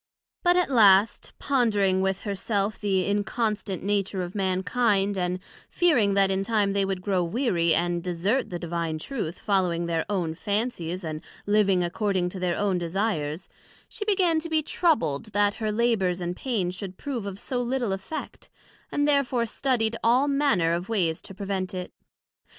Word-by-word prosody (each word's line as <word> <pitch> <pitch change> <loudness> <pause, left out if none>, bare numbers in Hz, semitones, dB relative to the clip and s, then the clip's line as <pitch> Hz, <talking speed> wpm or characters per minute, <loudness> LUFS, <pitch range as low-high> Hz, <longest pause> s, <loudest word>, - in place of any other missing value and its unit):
But 355 0 +4
at 360 -5 +1
last, 205 -3 +5
pondering 210 -8 +2
with 190 0 0
her 200 -2 -3
self 200 +1 -1
the 195 -3 +1
inconstant 205 -1 -1
nature 200 -1 0
of 175 +1 -6
Mankind, 200 +1 +1
and 180 -1 -1 0.3
fearing 240 - +3
that 195 -1 +4
in 190 0 0
time 205 -2 +1
they 200 0 +2
would 190 -1 -3
grow 190 -3 +1
weary, 170 - +1
and 175 0 0
desert 185 +8 0
the 175 - -4
divine 170 -2 -3
Truth, 175 - -4
following 180 -4 0
their 165 -1 0
own 175 -6 -1
fancies, 190 -2 -2
and 155 -1 -4 0.2
living 205 -3 +3
according 185 0 0
to 185 - -7
their 180 -1 -1
own 200 -3 +1
desires; 170 -3 -2 0.4
she 440 - -5
began 370 -6 +2
to 330 +1 -6
be 315 -1 +1
troubled 290 - +1
that 205 0 +3
her 215 -1 0
labours 210 -5 +1
and 175 0 -3
pains 200 -9 -2
should 185 0 -7
prove 245 -8 -4
of 195 0 -6
so 250 +2 -2
little 245 -3 -1
effect, 195 +11 -7 0.4
and 290 0 +1
therefore 270 -5 +2
studied 230 -1 0
all 250 +5 +4
manner 275 - +2
of 175 +4 -3
ways 175 -8 0
to 195 - -10
prevent 195 -1 -3
it. 180 -1 -6
200 Hz, 165 wpm, -26 LUFS, 180-230 Hz, 0.4 s, last